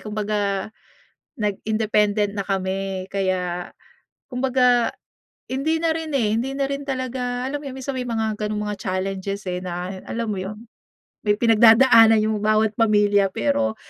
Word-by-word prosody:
kumbaga 210 -2 -2 0.7
nag-independent 210 0 0
na 200 - -1
kami, 190 -1 -2
kaya 180 -2 -2 0.6
kumbaga, 250 -2 +2 0.6
hindi 275 +5 0
na 330 -1 +2
rin 320 -1 -4
eh, 220 -5 +1
hindi 260 +4 -2
na 275 - +1
rin 280 0 -3
talaga, 255 -1 -3
alam 285 +2 -3
mo - - -11
'yon, 260 - -8
minsan 265 +1 -4
may 255 -1 -4
mga 220 -2 -1
gano'ng 210 0 -2
mga 210 -1 -4
challenges, 195 +1 -3
eh, 180 0 -3
na, 180 0 -4 0.2
alam 235 0 -2
mo 200 - -3
yo'n, 200 +3 -6 0.7
may 205 - +4
pinagdadaanan 225 0 +6
yung 215 -1 0
bawat 215 +1 +2
pamilya. 205 -2 +4
Pero 280 -4 0
215 Hz, 145 wpm, -22 LUFS, 200-250 Hz, 0.7 s, pinagdadaanan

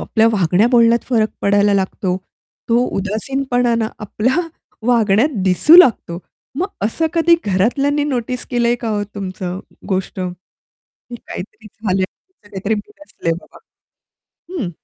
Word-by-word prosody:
आपल्या 225 0 +2
वागण्या 190 +1 +3
बोलण्यात 235 -1 +4
फरक 220 -4 +2
पडायला 205 0 +3
लागतो 190 -1 -1 0.5
तो 235 +2 +3
उदासीनपणा 245 +4 -1
ना, 225 -1 0
आपल्या 220 +5 -1 0.5
वागण्यात 230 0 +3 0.2
दिसू 195 - +6
लागतो. 225 - +5 0.4
मग 355 +6 0 0.2
असं 275 +10 0
कधी 335 0 +4
घरातल्यांनी 275 +10 +1
नोटीस 250 -3 -2
केलंय 240 -1 +2
का 230 - -3
हो 210 -1 -1
तुमचं 185 -2 -5 0.3
गोष्ट 190 0 -2
की 180 0 -7 0.6
काहीतरी 215 0 -9
झाले 195 -3 -2
आहे, 185 - -3
हीचं 210 - -24
काहीतरी 200 +2 -2
बिनसलंय 210 - -5
बाबा? - - -18 1.0
हं. 210 - -2
220 Hz, 130 wpm, -18 LUFS, 190-245 Hz, 1.0 s, दिसू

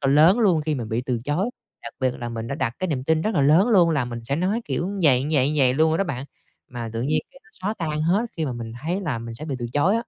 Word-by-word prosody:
còn 135 0 +2
lớn 165 +9 +6
luôn 190 -9 +3
khi 155 0 -1
mình 120 -5 -4
bị 115 +3 -1
từ 120 -3 -1
chối. 175 - 0 0.3
Đặc 115 - -8
biệt 130 -1 +1
là 120 - -4
mình 115 -1 -5
đã 140 - -2
đặt 115 -5 -2
cái 185 - -1
niềm 135 -5 -2
tin 160 +1 +2
rất 215 +2 -1
là 145 - +3
lớn 160 - +5
luôn 180 -7 +5
là 145 -5 +1
mình 120 -1 -7
sẽ 140 +4 -1
nói 190 +7 0
kiểu 175 - -2
vầy, 135 -3 +5
vầy, 140 -1 +3
vầy 130 -3 +3
luôn 160 +3 +3
rồi 160 - +1
đó 195 - +2
bạn, 135 -6 -4 0.4
mà 120 -2 -6
tự 115 - -3
nhiên 150 +4 +1
cái 270 0 -18
nó 220 - -23
xóa 200 +4 -3
tan 155 -2 -2
hết 180 +7 +2
khi 160 - -1
mà 130 - -2
mình 115 -2 -6
thấy 175 +5 -1
là 150 -11 -2
mình 115 0 -7
sẽ 150 - -8
bị 145 -4 -3
từ 120 - -3
chối 155 +9 +3
á. - - 0
150 Hz, 310 wpm, -23 LUFS, 125-175 Hz, 0.4 s, lớn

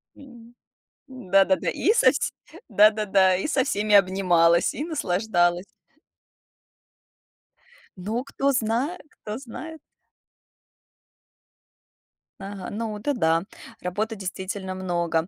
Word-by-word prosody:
М. 240 -4 -15 0.5
Да-да-да, 250 0 +1
и 430 - +1
со 260 - +5
вс 280 - -2 0.4
да-да-да, 205 -3 +4
и 195 - -3
со 270 -3 +1
всеми 210 -5 +1
обнималась, 180 -3 +3
и 290 - -4
наслаждалась. 180 - 0 2.3
Ну, 215 +7 -3
кто 275 0 -1
знает 250 +7 -1 0.2
кто 210 +2 -5
знает. 315 +5 -9 2.6
Ага. 195 -1 -7
Ну, 215 0 -4
это 255 +8 -2
да, 165 -7 +1 0.4
работы 210 +5 -3
действительно 190 0 -5
много. 170 -3 -1
210 Hz, 95 wpm, -24 LUFS, 185-245 Hz, 2.6 s, со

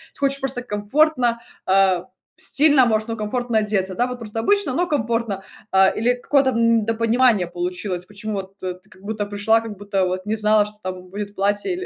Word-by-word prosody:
ты - - -16
хочешь 275 0 +1
просто 260 -2 -2
комфортно, 240 +3 +1 0.3
а, 190 -2 +3 0.3
стильно 290 -3 +4
может, 220 -2 0
но 230 - -3
комфортно 230 +2 -1
одеться, 195 -3 -1
да 245 +4 +1
вот, 250 -1 -6
просто 225 -1 -5
обычно, 400 - +1
но 355 +3 +1
комфортно. 230 - -1 0.3
А 190 0 +6
или 240 +3 +1
какое-то, 265 +2 +2
м, 230 -1 +3
недопонимание 225 -2 +2
получилось, 180 +1 -4
почему 210 +1 -6
вот 195 0 -6
ты, 185 -1 -4
как 185 - -19
будто 210 0 -3
пришла, 205 +2 +2
как 225 -2 -7
будто 200 -1 -1
вот 185 +1 -3
не 215 - 0
знала, 215 -1 +3
что 210 0 -10
там 185 0 -6
будет 205 +1 -6
платье 205 - 0
или 370 +1 -5
215 Hz, 190 wpm, -21 LUFS, 195-245 Hz, 0.3 s, А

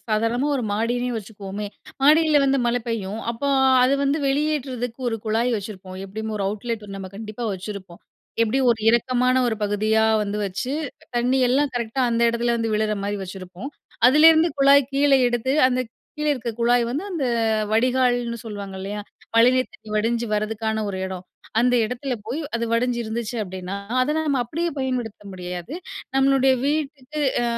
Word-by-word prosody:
சாதாரணமா 230 +5 +1
ஒரு 255 - -2
மாடியிலே 240 +4 0
வச்சுக்குவோமே! 205 -1 -6 0.4
மாடியில 305 +1 +5
வந்து 275 0 +2
மழை 240 +1 +1
பெய்யும். 215 -2 -3
அப்போ, 235 +5 -3 0.3
அது 255 +2 +4
வந்து 280 +2 +1
வெளியேற்றதுக்கு 270 -4 -1
ஒரு 225 - -1
குழாய் 225 +3 +1
வச்சிருப்போம். 190 -3 -8
எப்பிடியும் 220 +3 -5
ஒரு 200 - -2
அவுட்லெட் 215 +1 -4
நம்ம 190 -1 -7
கண்டிப்பா 215 +2 -6
வச்சுருப்போம். 190 -1 -8 0.4
எப்பிடியும் 250 +3 +2
ஒரு 225 - -7
இறக்கமான 250 +2 +2
ஒரு 225 -2 0
பகுதியா 215 +2 +2 0.2
வந்து 205 0 -3
வச்சு 200 +8 -4 0.4
தண்ணி 245 +2 +2
எல்லாம் 275 +3 +2
கரெக்டா 235 +2 -2
அந்த 230 0 +1
இடத்துல, 235 +1 0
வந்து 225 -1 -1
விழுற 215 0 +1
மாரி 205 +1 -2
வச்சுருப்போம். 185 +5 -8 0.4
அதுலேருந்து 315 +5 +6
குழாய் 275 -1 +5
கீழே 275 0 +4
எடுத்து, 240 +2 -1 0.2
அந்த 255 0 0 0.4
கீழே 300 0 +1
இருக்க 245 -4 -3
குழாய் 240 +1 +3
வந்து 285 +7 -2
அந்த 320 -6 -1 0.5
வடிகால்ன்னு 245 0 +2
சொல்லுவாங்க 200 -3 -6
இல்லயா! 205 +2 -4 0.3
மழைநீர் 250 +3 +4
தண்ணி 220 - -16
வடிஞ்சு 230 +2 0
வர்றதுக்கான 220 +1 -1
ஒரு 190 -2 -4
இடம். 185 -1 -7 0.4
அந்த 245 +1 +3
இடத்துல 250 +4 -4
போய் 255 +8 -3
அது 235 0 0
வடிஞ்சு 240 +1 +1
இருந்துச்சு 230 +1 -4
அப்பிடின்னா, 185 0 -6 0.2
அத 285 +4 +1
நம்ம 300 -4 0
அப்பிடியே 335 +8 -2
பயன்படுத்த 250 -6 -3
முடியாது. 180 - -6 0.4
நம்மளுடைய 270 0 +4
வீட்டுக்கு 295 -1 -2 0.2
ஆ - - +1
235 Hz, 155 wpm, -23 LUFS, 215-265 Hz, 0.5 s, அதுலேருந்து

